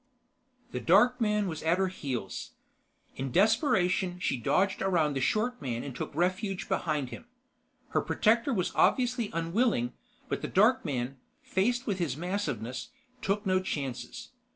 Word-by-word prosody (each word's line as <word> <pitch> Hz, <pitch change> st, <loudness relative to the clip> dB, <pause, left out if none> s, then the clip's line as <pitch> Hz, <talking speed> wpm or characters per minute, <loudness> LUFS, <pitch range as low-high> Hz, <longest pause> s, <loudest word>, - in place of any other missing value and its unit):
The -, -, -3 dB
dark 240 Hz, +8 st, +4 dB
man 210 Hz, -2 st, +2 dB
was 160 Hz, -3 st, -4 dB
at 165 Hz, +2 st, +2 dB
her 190 Hz, 0 st, +1 dB
heels. 135 Hz, -9 st, -5 dB, 0.6 s
In 135 Hz, 0 st, -3 dB
desperation, 190 Hz, -, +2 dB
she -, -, 0 dB
dodged 190 Hz, -, +1 dB
around 170 Hz, -6 st, +2 dB
the 135 Hz, -, -2 dB
short 215 Hz, -, 0 dB
man 120 Hz, -3 st, -3 dB
and 135 Hz, -3 st, -6 dB
took -, -, -4 dB
refuge 185 Hz, +2 st, -1 dB
behind 150 Hz, -6 st, -1 dB
him. 240 Hz, -, -9 dB, 0.6 s
Her -, -, +1 dB
protector 230 Hz, +5 st, +2 dB
was 185 Hz, -8 st, 0 dB
obviously 245 Hz, -3 st, +2 dB
unwilling, 165 Hz, -, +1 dB, 0.3 s
but -, -, -2 dB
the -, -, -3 dB
dark 220 Hz, +7 st, +4 dB
man, 135 Hz, -3 st, -3 dB, 0.3 s
faced 240 Hz, +6 st, 0 dB
with 195 Hz, -3 st, -1 dB
his 150 Hz, -7 st, -1 dB
massiveness, 175 Hz, -, -3 dB, 0.3 s
took 210 Hz, 0 st, -1 dB
no 185 Hz, -1 st, +3 dB
chances. 155 Hz, -, -5 dB
185 Hz, 150 wpm, -29 LUFS, 150-215 Hz, 0.6 s, dark